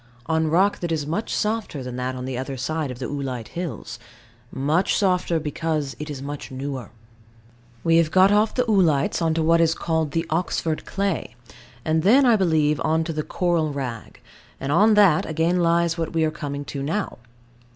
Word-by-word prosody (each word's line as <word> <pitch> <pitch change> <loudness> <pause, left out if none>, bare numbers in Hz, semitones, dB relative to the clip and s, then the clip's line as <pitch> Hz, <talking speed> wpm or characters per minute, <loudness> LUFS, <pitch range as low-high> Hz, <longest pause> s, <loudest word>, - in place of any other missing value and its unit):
On 160 +1 +1
rock 185 +6 +2
that 175 -1 -3
is 155 -3 -1
much 170 +9 -3
softer 210 - -2
than 125 -1 -6
that 125 +1 -3
on 125 0 -5
the 130 -1 -4
other 130 +2 -4
side 155 +3 -2
of 125 - -6
the 125 - -5
oolite 130 -4 -4
hills: 170 -8 -6 0.5
much 150 +7 +1
softer, 180 -4 +1
because 150 -3 -2
it 150 +1 -6
is 140 -2 -6
much 145 0 -6
newer. 135 -1 -5 0.9
We 165 0 +4
have 165 -2 +3
got 190 +3 +5
off 210 +1 +2
the 250 - +2
oolites 175 -9 +2
on 165 -1 +1
to 165 - +1
what 165 +1 +4
is 165 -1 +3
called 160 -3 -1
the 165 0 0
Oxford 160 -1 -1
clay; 195 -10 -2 0.5
and 160 0 +2
then, 245 - +5
I 240 -2 +5
believe, 155 -6 +2
on 160 +1 +1
to 165 0 -4
the 155 - -1
Coral 170 -1 0
rag, 130 -6 -6 0.4
and 135 +1 -3
on 210 +7 +5
that 195 -7 +5
again 165 +3 +1
lies 170 0 +2
what 165 0 -3
we 165 -1 +1
are 155 - 0
coming 145 -2 -5
to 140 - -5
now. 165 +6 -3
160 Hz, 195 wpm, -23 LUFS, 145-175 Hz, 0.9 s, got